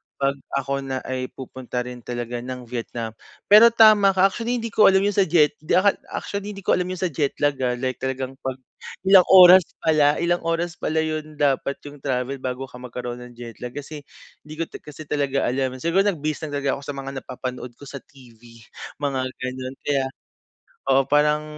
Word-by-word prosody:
pag 140 0 0 0.2
ako 140 0 -2
na 135 -1 -4
ay 130 0 -3
pupunta 130 -1 -5
rin 125 0 -8
talaga 120 0 -5
ng 125 0 -7
Vietnam. 115 -1 -5 0.4
Pero 215 +3 +10
tama 215 -3 +6
ka, 190 0 +5
actually 240 +1 -2
hindi 230 -1 -5
ko 215 - +6
alam 190 0 +3
yun 205 - +2
sa 195 -1 +2
jet 155 -3 +4
di 155 - 0
akal 200 +2 +5 0.2
actually 200 0 -5
hindi 195 - -10
ko - - +1
alam 180 0 +1
yun 185 - -4
sa 180 -2 -2
jet 145 -1 -1
lag 145 -2 +1
ha 125 -1 0
like 130 +1 -3
talagang 130 0 -3
pag 130 -1 -4 0.5
ilang 190 -1 +6
oras 185 -1 +8 0.2
pala 150 -2 +4
ilang 175 0 +1
oras 165 +1 -2
pala 160 0 0
yun 155 -1 -4
dapat 140 -1 0
yung 145 0 -11
travel 130 0 -2
bago 130 0 -4
ka 125 -2 -11
magkaroon 125 0 -6
ng 120 - -16
jet 115 -2 -10
lag. 125 0 -7
Kasi 145 +1 -7 0.5
hindi 155 - -9
ko 165 - -2
ta - - -9
kasi 150 +1 -11
talaga 140 -2 -1
alam. 130 0 -1
Siguro 190 +4 +2
nag-base 155 -4 -2
lang 145 - -8
talaga 140 0 0
ako - - -13
sa 145 - -4
mga 135 0 -6
napapanood 125 -1 -7
ko - - -16
sa 140 -1 -8
TV 125 -5 -19 0.6
mga 140 -2 0 0.2
ganun. 130 +1 -5
Kaya, 140 -2 0 0.8
oo 135 0 +4
parang 150 +2 +2
140 Hz, 200 wpm, -23 LUFS, 130-165 Hz, 0.8 s, Pero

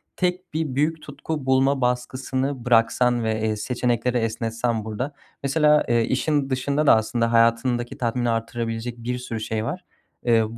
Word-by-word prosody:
tek 180 -1 -2
bir 155 -4 -2
büyük 155 +3 0
tutku 150 0 -5
bulma 135 +1 +3
baskısını 130 +1 -1
bıraksan 120 0 +3
ve, 110 -1 -1
eee, 110 0 0
seçenekleri 125 +2 0
esnetsen 115 0 -1
burada. 125 +7 -4 0.3
Mesela, 150 +1 +3
ııı, 120 -1 +3
işin 135 +4 0
dışında 140 +3 0
da - - +8
aslında 115 +1 0
hayatındaki 115 +1 +2
tatmini 120 0 0
artırabilecek 115 +1 -3
bir 120 +1 -3
sürü 125 -2 -5
şey 110 0 -2
var. 180 +9 -5 0.4
Iıı 115 -1 +2
125 Hz, 150 wpm, -23 LUFS, 115-135 Hz, 0.4 s, da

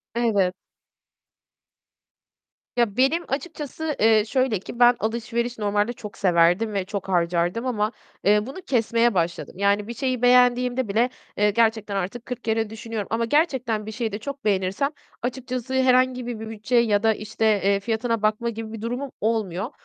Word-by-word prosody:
Evet. 205 -6 +2 2.2
Ya, 235 -4 +1
benim 290 +7 +2
açıkçası, 300 +1 -4
eee, 220 -1 +4
şöyle 255 -3 +1
ki 235 +5 -10
ben 245 0 +7
alışveriş 235 +2 -2
normalde 210 +2 0
çok 210 -3 -10
severdim 180 +4 +3
ve 195 -2 -1
çok 200 -1 -5
harcardım 175 +4 +1
ama 215 -4 0 0.3
eee, 210 +1 +4
bunu 275 +9 -8
kesmeye 235 -4 +2
başladım. 170 -2 -1
Yani 200 +1 +1
bir 235 - -5
şeyi 255 -1 -2
beğendiğimde 250 0 +4
bile, 225 +5 +2 0.3
eee, 210 0 +4
gerçekten 220 -2 +1
artık 195 +5 -3
kırk 250 -2 -6
kere 225 -1 0
düşünüyorum 220 -2 -5
ama 230 +1 +1
gerçekten 250 -6 +1
bir 220 - -6
şeyi 225 0 -3
de 205 - -4
çok 280 +2 -7
beğenirsem, 195 +6 +1 0.3
açıkçası 255 0 -4
herhangi 255 -1 +3
bir 240 -3 -4
bir 220 0 -6
bütçe 225 +3 -3
ya 220 -3 +3
da 225 0 +4
işte, 215 +1 -3 0.2
eee, 200 0 +3
fiyatına 225 +2 -1
bakma 215 +2 +1
gibi 225 -1 -6
bir 225 - -7
durumum 245 +4 -4
olmuyor. 215 0 -1
225 Hz, 160 wpm, -24 LUFS, 210-245 Hz, 2.2 s, ben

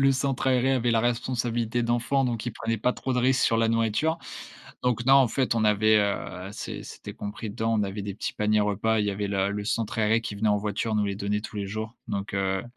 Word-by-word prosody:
le 135 0 +5
centre 135 0 0
aéré 130 0 +3
avait 120 -2 +1
la 115 -1 +3
responsabilité 120 0 0
d'enfants, 120 +3 +1
donc 120 -2 -2
il 120 - -2
prenait 115 0 -2
pas 125 +4 +1
trop 130 - -3
de 125 - +1
risques 130 +1 +3
sur 115 - +2
la 115 0 +3
nourriture. 115 +8 +1 0.7
Donc, 120 -2 0
non, 135 - +7
en 135 -3 +6
fait, 130 +1 0
on 110 - +2
avait, 110 +1 +4
heu 100 -2 -2
c'est - - -6
c'était - - -9
compris 105 +1 -6
dedans, 110 +2 -1
on - - +2
avait 100 +1 -4
des 100 -1 -5
petits - - -4
paniers 105 0 +2
repas, 105 +2 +1
il 105 - 0
y - - +1
avait 100 +1 -3
le 100 0 0
le 100 0 -3
centre 115 0 -1
aéré 110 +1 +3
qui 105 -2 -5
venait 110 +2 +1
en 105 - +3
voiture, 105 +2 -2
nous 105 -1 +2
les 100 -1 -2
donner 105 +1 -1
tous 110 - -8
les 100 -1 -2
jours. 110 +3 -5
Donc, 100 -1 -3
heu 95 -1 0
110 Hz, 250 wpm, -26 LUFS, 105-120 Hz, 0.7 s, non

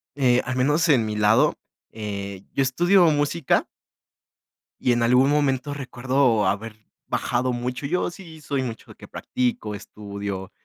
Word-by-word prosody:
Eh, 125 -3 +3
al 130 - -3
menos 150 +6 +2
en 125 -6 +4
mi 110 0 -3
lado, 110 +8 +3 0.4
eh, 100 -3 -6
yo - - +1
estudio 175 +8 +4
música 145 +1 +1 1.1
y 125 - +2
en 120 0 +1
algún 125 +3 +4
momento 145 -1 +1
recuerdo 130 -4 +1
haber 105 +3 -2 0.3
bajado 125 +1 -1
mucho, 125 +3 -4
yo 180 +6 0
sí 175 -4 -12
soy 140 -2 -2
mucho 115 -3 -7
de - - -14
que - - -13
practico, 120 -4 -2
estudio, 100 -2 -7
125 Hz, 145 wpm, -24 LUFS, 110-145 Hz, 1.1 s, en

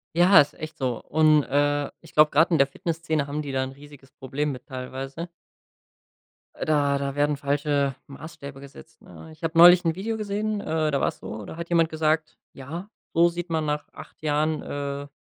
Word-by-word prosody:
Ja, 175 +2 +7
ist 145 - -2
echt 155 0 -8
so, 125 -3 -2
und, 155 -1 +4
äh, 145 +1 +1
ich - - -17
glaube, 150 0 +6
grad 160 +5 +3
in 165 - +3
der 140 - +5
Fitnessszene 160 0 -2
haben 145 +2 -3
die 145 -2 -5
da 130 0 0
'n 130 - -5
riesiges 140 -1 -15
Problem 145 +3 -3
mit 125 -2 -9
teilweise. 135 +5 -6 1.3
Äh, - - -4
da 145 -2 +2
da 140 0 -3
werden 145 0 +1
falsche 140 -1 0
Maßstäbe 140 -1 -10
gesetzt, 140 0 -14
ne? 160 - -13
Ich 155 +1 -17
habe 165 0 -2
neulich 175 +1 +9
'n 165 0 +1
Video 220 +4 -3
gesehen, 210 0 -2
äh, 155 -3 0
da 140 - +1
war - - +2
es - - -3
so, 105 -2 -7
da - - -8
hat 170 0 -6
jemand 165 -2 +3
gesagt: 155 0 0 0.2
„Ja, 165 +9 -8 0.2
so 170 +1 +5
sieht 175 +1 -6
man 160 -2 0
nach 150 0 -2
8 - - -13
Jahren, 155 +1 0
äh, 140 0 -5
150 Hz, 200 wpm, -25 LUFS, 140-165 Hz, 1.3 s, neulich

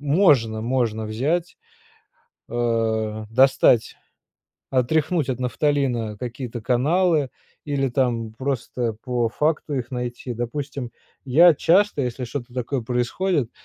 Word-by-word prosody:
можно, 140 - +3
можно 115 -3 0
взять, 155 +11 -1 0.9
э, 110 -2 -1
достать, 130 -1 +4 0.7
отряхнуть 145 +3 +1
от 125 - -3
нафталина 125 -4 0
какие-то 120 -1 -5
каналы 150 +4 +2 0.3
или 140 -2 0
там 120 -3 -1
просто 125 -3 -2
по 120 -3 0
факту 150 +1 -1
их 125 -1 -4
найти. 125 -1 -4
Допустим 135 +1 -4 0.3
я 160 +6 +6
часто, 180 0 +3
если 125 0 -3
что-то 120 0 -6
такое 125 0 -2
происходит, 125 +4 -1
125 Hz, 105 wpm, -23 LUFS, 120-145 Hz, 0.9 s, я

